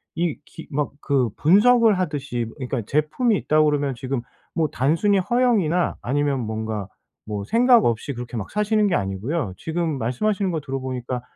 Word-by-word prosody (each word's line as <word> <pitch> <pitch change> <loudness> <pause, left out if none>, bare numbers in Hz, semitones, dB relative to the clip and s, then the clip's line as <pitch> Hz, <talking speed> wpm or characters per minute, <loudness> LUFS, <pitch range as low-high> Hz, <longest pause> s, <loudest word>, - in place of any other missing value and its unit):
이 170 -2 0
기 165 - -12
막 145 0 -1
그 135 -4 +1
분석을 215 +5 +5
하듯이 145 -8 -2
그러니까 130 -3 -3
제품이 155 - +1
있다고 155 0 +2
그러면 145 -3 0
지금 130 0 -3 0.3
뭐 160 -2 +1
단순히 165 +11 +2
허영이나 195 -6 +1
아니면 140 +1 0
뭔가 110 -2 -4 0.4
뭐 105 -2 -4
생각 240 - +5
없이 120 +4 -1
그렇게 120 0 -7
막 100 - -5
사시는 210 0 +2
게 185 - +1
아니고요 100 - -2
지금 160 -2 -2
말씀하시는 190 - 0
거 165 - -1
들어보니까 130 -2 -4
145 Hz, 360 characters per minute, -23 LUFS, 125-185 Hz, 0.4 s, 분석을